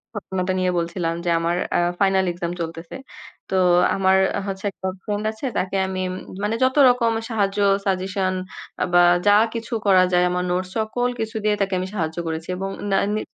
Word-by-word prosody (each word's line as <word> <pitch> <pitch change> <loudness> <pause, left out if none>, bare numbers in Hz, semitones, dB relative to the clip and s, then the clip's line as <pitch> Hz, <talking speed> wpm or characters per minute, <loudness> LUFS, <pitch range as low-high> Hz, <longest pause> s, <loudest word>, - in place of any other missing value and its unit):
ঘটনাটা 190 -2 -2
নিয়ে 185 0 +1
বলছিলাম 170 0 -2
যে - - +1
আমার 170 +1 0 0.2
আ - - +3 0.2
ফাইনাল 190 -1 +3
এক্সাম 170 0 -4
চলতেছে। 165 +3 -6 0.5
তো - - -1 0.4
আমার 190 0 +3 0.3
হচ্ছে 190 0 -5
একটা 190 - -6 0.2
ফ্রেন্ড 210 0 -3
আছে 220 +5 -8
তাকে 190 +1 -1
আমি 190 0 -3
উম - - -5 0.3
মানে 210 +2 0
যতরকম 255 -3 +4 0.2
সাহায্য 205 -3 0 0.3
সাজেশন 190 0 -1 0.5
আ - - +3
বা 175 - +7 0.3
যা 205 - +7 0.2
কিছু 230 +1 -5
করা 190 -2 +6
যায় 180 0 +4
আমার 180 0 -1
নোটস 180 +1 -1
সকল 235 +3 -1
কিছু 220 0 -4
দিয়ে 210 0 +2
তাকে 195 -1 0
আমি 185 - -3
সাহায্য 160 -4 -2
করেছি। 160 0 -4
এবং 195 +1 -3 0.2
না 195 - +3 0.2
নি 215 - -1
190 Hz, 180 wpm, -22 LUFS, 180-210 Hz, 0.5 s, বা